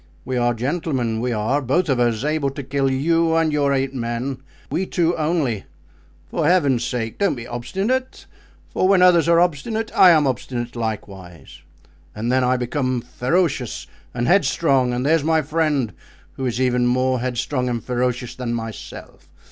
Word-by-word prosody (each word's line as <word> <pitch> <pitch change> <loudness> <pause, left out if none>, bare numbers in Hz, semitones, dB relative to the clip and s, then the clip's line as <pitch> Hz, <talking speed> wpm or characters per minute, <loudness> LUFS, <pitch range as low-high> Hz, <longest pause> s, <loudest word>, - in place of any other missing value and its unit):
We 130 - -3
are 120 -1 +1
gentlemen; 130 -3 -1
we 125 0 -1
are, 115 +6 0
both 145 +8 +1
of 135 -4 +1
us, 120 -1 +1
able 150 -2 0
to 135 +1 -7
kill 135 +1 0
you 165 +5 +2
and 165 -2 +2
your 145 -1 +2
eight 135 0 0
men—we 130 +8 -4
two 170 -1 +1
only. 150 - -1 0.7
For 155 - 0
Heaven's 145 -9 +3
sake 115 -2 -3
don't 200 -6 +2
be 115 -2 -7
obstinate, 195 - -3 0.5
for 185 - +1
when 190 -2 +5
others 170 -2 +5
are 170 0 +5
obstinate 180 +7 -1
I 185 - +8
am 155 -4 +5
obstinate 125 -2 -3
likewise, 95 -8 -6 0.5
and 115 +3 -2
then 130 0 +2
I 125 +1 +2
become 130 0 -1
ferocious 135 +1 -1 0.3
and 120 0 -2
headstrong, 140 -8 +2
and 125 +2 -2
there's 160 0 +3
my 160 0 +2
friend, 150 -7 0 0.4
who 130 - -3
is 120 0 -2
even 125 -1 +2
more 130 +1 +1
headstrong 125 +1 -2
and 120 -3 -3
ferocious 125 0 -2
than 125 -2 -3
myself. 115 -6 -8
130 Hz, 165 wpm, -21 LUFS, 120-160 Hz, 0.7 s, I